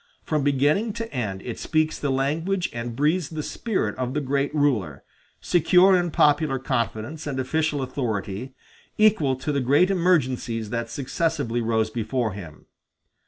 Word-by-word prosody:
From 150 -3 -1
beginning 145 - +2
to 230 0 -6
end 105 -7 -3
it 120 - -6
speaks 155 0 0
the 145 - -1
language 160 +8 0
and 120 0 -5
breathes 150 +3 +1
the 155 -2 -5
spirit 190 - -2
of 130 +1 -2
the - - +2
great 140 0 -1
ruler, 110 - 0 0.4
secure 180 +2 +5
in 175 -1 +1
popular 150 -2 +3
confidence 130 +3 -3
and 135 -2 -3
official 150 +1 0
authority, 125 -2 -4 0.4
equal 200 -11 +4
to 130 +4 -3
the 140 -1 0
great 145 +9 +3
emergencies 130 - 0
that 115 -1 -2
successively 140 -2 -1
rose 110 -1 0
before 120 0 -1
him. 85 -6 -10
140 Hz, 150 wpm, -24 LUFS, 120-160 Hz, 0.4 s, secure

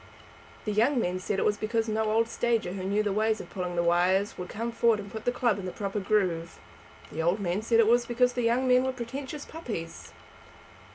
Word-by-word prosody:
The 210 - -1
young 240 +6 +3
men 180 -4 -1
said 195 +1 -2
it - - +1
was 210 - +2
because 225 +2 -1
no 220 0 0
old 225 +1 +2
stager 230 -5 0
who 190 0 -5
knew 200 +3 +1
the 205 -2 0
way 215 +2 +1
of 215 - -9
pulling 180 -2 -4
the 170 - +1
wires 180 +4 +2
would 180 0 -7
come 230 +2 -3
forward 230 -2 +3
and 200 -1 -8
put 220 -1 -7
the 245 - +3
club 235 -5 +1
in 190 - -6
the - - -4
proper 200 +1 -3
groove. 185 -5 0 0.5
The 160 - -3
old 175 +5 +1
men 185 +1 -1
said 230 +1 +2
it 230 - +6
was 240 +2 +3
because 245 +1 +2
the 245 - -1
young 240 +3 +2
men 250 0 +5
were 260 0 -1
pretentious 265 +4 -6
puppies. 220 - -7
215 Hz, 230 wpm, -28 LUFS, 190-235 Hz, 0.5 s, it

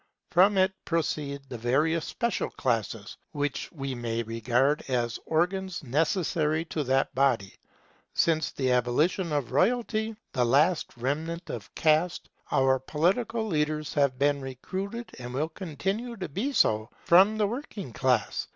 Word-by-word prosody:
From 190 +3 +5
it 190 0 +3
proceed 150 -4 -2
the 125 -3 -7
various 150 +7 +1
special 235 -1 -1
classes, 115 -4 -2 0.2
which 145 -2 -2
we 135 -5 -4
may 115 -1 -2
regard 120 +6 +1
as 120 -3 -1
organs 180 +2 0
necessary 155 +2 +1
to 155 - 0
that 135 +1 +1
body. 125 -8 +1 0.6
Since 160 -2 +2
the 130 -2 0
abolition 150 +9 +1
of 145 -5 -1
royalty, 220 - +1 0.2
the 125 - +2
last 150 +5 +2
remnant 160 +7 -3
of 105 -5 -7
caste, 160 +2 +2 0.2
our 130 0 +3
political 195 - 0
leaders 155 -4 -1
have 140 -3 +2
been 140 +1 +2
recruited, 190 - -5
and 125 0 -6
will 155 +4 0
continue 195 - -4
to 185 -2 -4
be 215 - -2
so, 110 - +2 0.2
from 195 +5 +6
the 215 - +3
working 205 - -5
class. 125 -3 +1
150 Hz, 140 wpm, -28 LUFS, 130-185 Hz, 0.6 s, from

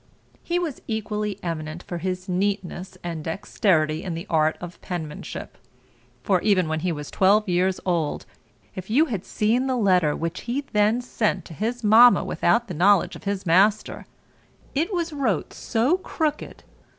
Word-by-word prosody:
He 345 - -1
was 335 -6 -3
equally 210 -2 -3
eminent 165 -1 -4
for 175 - -5
his 185 +2 -4
neatness 185 -1 -2
and 165 -3 -4
dexterity 160 -2 0
in 175 -3 -4
the 170 +3 -6
art 155 -1 +2
of 175 0 -9
penmanship; 160 -5 -6 0.6
for, 185 -3 +2
even 190 -5 +2
when 160 0 -1
he 175 +2 -1
was 150 -2 -6
twelve 205 +3 +3
years 180 +1 +1
old, 170 -5 -1 0.5
if 185 +1 -8
you 280 +9 +4
had 210 - -4
seen 235 +5 0
the 260 - 0
letter 180 -8 +3
which 165 +2 -4
he 265 +4 0
then 210 +3 +3
sent 215 -7 -1
to - - -10
his 230 +7 -3
mamma 230 +3 +7
without 235 0 +1
the 185 - -5
knowledge 180 +1 +3
of - - -12
his 200 -1 -2
master, 195 +5 +2 0.7
it 325 +8 0
was 340 -4 -2
wrote 240 - -1
so 255 +11 0
crooked 310 -5 -3
(i. - - -30
195 Hz, 165 wpm, -24 LUFS, 175-225 Hz, 0.7 s, mamma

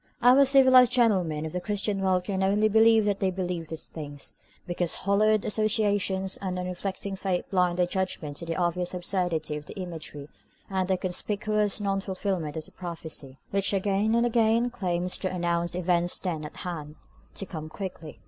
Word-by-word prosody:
Our 255 +3 +7
civilised 260 -2 +7
gentlemen 185 -11 +2
of 160 - -5
the 180 - -2
Christian 205 0 -1
World 185 -1 +2
can 190 0 -2
only 205 +3 +3
believe 220 0 +5
that 205 -1 0
they 195 - +1
believe 180 -3 -3
these 160 -1 -4
things, 145 -3 -7 0.3
because 175 -1 -1
hallowed 210 +2 +2
associations 205 -3 0
and 185 -2 -3
unreflecting 185 +2 -4
faith 190 -2 -2
blind 180 -2 +2
their 180 - +3
judgment 175 -6 -3
to 170 - -5
the 165 - -2
obvious 175 0 -1
absurdity 175 -4 -1
of 150 - -10
the - - -9
imagery 160 -5 -7 0.4
and 190 -1 0
the 190 -1 +1
conspicuous 210 +3 0
non 195 -1 -1
fulfilment 185 -5 -3
of 155 - -5
the - - -17
prophecy, 160 -6 -4
which 200 +1 +2
again 200 +3 +1
and 235 +1 +3
again 235 +1 +2
claims 180 -4 -1
to 185 - -2
announce 175 -1 -1
events 175 -1 +1
then 165 -5 -3
at 150 - -10
hand, 155 -4 -6 0.4
to 195 - -4
come 155 -3 -7
quickly. 165 - -7
185 Hz, 175 wpm, -27 LUFS, 175-205 Hz, 0.4 s, Our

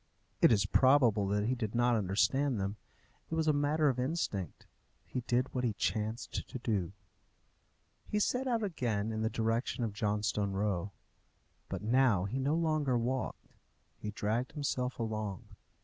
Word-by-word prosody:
It - - +7
is 100 -3 +4
probable 120 -6 +4
that 105 +1 +1
he 120 - +1
did 115 -3 -3
not 120 0 +3
understand 110 +6 +1
them. 100 +2 -2 0.5
It 160 - -2
was 160 -1 +1
a 155 - +5
matter 145 +2 +2
of 130 -3 +1
instinct. 125 - -2 0.4
He 125 - -3
did 125 +2 +1
what 125 - -1
he 115 -3 +1
chanced 110 +2 -2
to - - -5
do. 105 -7 -1 1.2
He 210 - 0
set 250 +5 +1
out 230 -3 +1
again 115 - -1
in 110 0 -2
the 110 - +1
direction 115 +3 -1
of 110 -3 -2
Johnstone 105 -1 0
Row. 100 -1 -1 0.8
But - - -4
now 115 -5 +3
he 125 +7 -2
no 140 +4 +1
longer 155 -6 +1
walked; 125 +2 -2 0.5
he 105 - -4
dragged 110 +4 -2
himself 130 -4 -2
along. 110 -4 -3
115 Hz, 160 wpm, -32 LUFS, 105-135 Hz, 1.2 s, It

